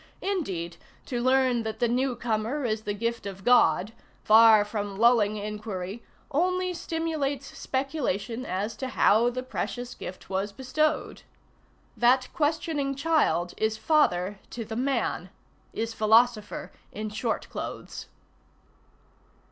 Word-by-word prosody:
Indeed, 185 - -2 0.3
to 245 -2 -3
learn 255 -1 +3
that 220 -1 -4
the 240 - +2
new 250 +2 0
comer 235 +5 -2
is 220 -1 -2
the 205 - -1
gift 230 0 -2
of 195 -1 -8
God, 225 -3 +4 0.3
far 220 -1 +7
from 205 -2 -4
lulling 220 -2 +4
inquiry, 210 -1 -5 0.3
only 365 +4 +1
stimulates 310 -5 -3
speculation 255 -4 -2
as 205 +1 -3
to 260 - -3
how 235 -2 +4
the 255 +1 -4
precious 245 -1 -4
gift 185 - -9
was 195 +2 -2
bestowed. 270 +7 -1 0.7
That 255 +2 +3
questioning 295 -2 0
child 275 - +1
is 220 0 0
father 205 - +2
to 230 -2 -6
the 220 +1 -6
man, 240 -7 -1 0.4
is 225 0 -3
philosopher 220 0 +2 0.2
in 215 0 -5
short 220 +2 -2
clothes. - - -6
235 Hz, 125 wpm, -27 LUFS, 210-265 Hz, 0.7 s, far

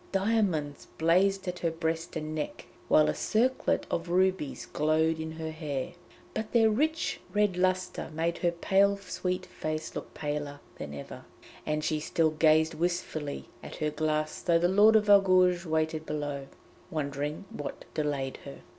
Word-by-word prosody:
Diamonds 195 -8 0
blazed 190 +4 +3
at 180 0 -3
her 170 - +1
breast 165 0 -3
and 155 -1 -4
neck, 155 -1 -4 0.2
while 155 - +5
a - - +1
circlet 255 +4 +1
of 170 +1 -2
rubies 185 -4 +1
glowed 160 +1 +1
in 160 0 -4
her 160 0 -5
hair. 150 -4 -4 0.4
But 220 0 -4
their 225 -2 +5
rich 315 +8 0 0.2
red 205 -3 +3
lustre 185 0 0
made 165 +2 -1
her 175 - +2
pale 195 +4 +3
sweet 185 -1 -3
face 155 -1 -4
look - - -7
paler 145 -1 -3 0.2
than 75 0 -6
ever, 70 - -9 0.4
and 150 0 0
she 155 -1 0
still 160 +1 +1
gazed 155 +1 +4
wistfully 165 -4 -3
at - - -9
her 150 -1 -1
glass 155 0 -1
though 170 -2 +3
the 170 +1 +3
Lord 205 +4 +6
of 210 -1 +4
Argouges 185 -3 +5
waited 160 0 -1
below, 145 -2 -3 0.4
wondering 150 +3 -3
what 145 - -6
delayed 145 -3 -2
her. 140 - -10
160 Hz, 155 wpm, -29 LUFS, 155-185 Hz, 0.4 s, Lord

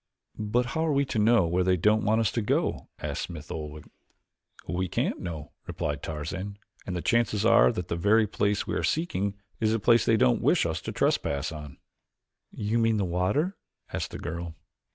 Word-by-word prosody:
"But 110 +4 +1
how 160 - 0
are - - +2
we 140 0 +2
to 125 -4 -2
know 110 -2 +5
where 90 +2 +1
they 90 0 +3
don't 105 +5 +3
want 110 +2 +3
us 105 -4 +1
to 115 - -1
go?" 105 - 0
asked - - -4
Smith 80 -4 -7
Oldwick. 75 -1 -6 0.8
"We 90 +1 -1
can't - - -1
know," 80 -4 -6 0.2
replied 70 -1 -3
Tarzan, 90 +7 -5 0.3
"and 90 - -3
the 90 - -3
chances 115 -3 +2
are 115 +1 +6
that 90 -7 -4
the 85 - -2
very 105 +6 +4
place 105 0 0
we - - -3
are - - 0
seeking 100 - 0 0.2
is 110 -1 +2
the 115 - +1
place 115 +3 +4
they 110 - +3
don't 65 - +3
wish - - +3
us - - -2
to - - -5
trespass 70 +2 0
on." 75 -3 -8 0.7
"You 110 +3 -1
mean 115 -1 +3
the 100 - +1
water?" 100 - 0 0.4
asked - - -2
the - - -7
girl. 85 -1 -5
100 Hz, 195 wpm, -27 LUFS, 85-115 Hz, 0.8 s, are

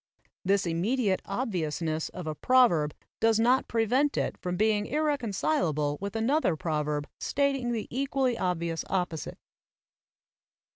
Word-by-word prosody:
This 195 +1 +2
immediate 190 +5 0
obviousness 165 - -2
of 180 - -8
a 155 - -2
proverb 170 - +3 0.2
does 225 -1 +3
not 250 +3 +3
prevent 245 +6 +1
it - - 0
from 180 -1 -4
being 215 0 +2
ir 305 +2 0
reconcilable 200 - 0
with 200 +2 -4
another 225 - +2
proverb 150 -2 -2
stating 275 -3 0
the 225 -3 -2
equally 265 -1 0
obvious 170 -5 -1
opposite. 180 -4 -2
205 Hz, 125 wpm, -28 LUFS, 165-255 Hz, 0.2 s, proverb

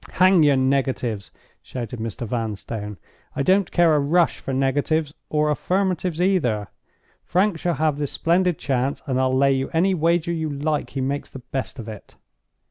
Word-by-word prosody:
"Hang 185 -1 +5
your 145 -2 +5
negatives!" 130 -5 0 0.3
shouted 120 -2 -6
Mr. 115 +2 -4
Vanstone. 110 -2 -4 0.4
"I 140 - 0
don't 190 +3 +3
care 170 -2 +4
a 150 - +4
rush 165 +4 +2
for - - -5
negatives, 145 +3 0 0.2
or 150 0 +2
affirmatives 180 0 -1
either. 135 - +1 0.5
Frank 185 -1 +1
shall 175 0 0
have 150 0 0
this 145 -2 -2
splendid 175 0 +1
chance; 135 0 -1
and 130 -1 0
I'll 130 0 +2
lay 135 0 +4
you 135 0 -1
any 185 +4 +3
wager 170 0 +1
you 160 -2 -2
like 145 +1 -2
he 135 - -4
makes 140 +2 -2
the - - -9 0.2
best 135 +1 -3
of 115 -3 -7
it." 110 -2 -10
145 Hz, 170 wpm, -23 LUFS, 130-170 Hz, 0.5 s, Hang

